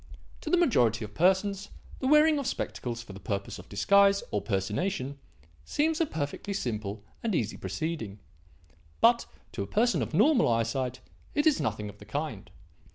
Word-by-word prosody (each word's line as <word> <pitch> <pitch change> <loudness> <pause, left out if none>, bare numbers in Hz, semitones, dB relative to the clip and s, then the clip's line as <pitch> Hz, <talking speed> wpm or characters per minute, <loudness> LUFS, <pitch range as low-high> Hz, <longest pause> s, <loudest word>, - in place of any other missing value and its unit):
To - - -5
the 360 - +4
majority 120 - +3
of 105 - -12
persons, 190 - +2 0.3
the 260 - -1
wearing 300 +1 +5
of 275 - -3
spectacles 120 - -3
for 105 - -11
the 95 - -9
purpose 100 -3 -4
of - - -13
disguise 200 - +4
or 105 - 0
personation, 130 - -2 0.4
seems 315 +2 0
a 325 - +2
perfectly 160 - -4
simple 105 - -3 0.2
and 220 -5 0
easy 110 -7 -1
proceeding. 105 - -4 0.8
But, - - +4 0.2
to - - -4
a 100 - -3
person 235 - +2
of - - -3
normal 245 - +5
eyesight, 120 +2 0 0.3
it 295 - +2
is 305 -2 +4
nothing 105 - -2
of 105 0 -11
the 105 - -12
kind. 130 -3 -4
140 Hz, 165 wpm, -29 LUFS, -, 0.8 s, wearing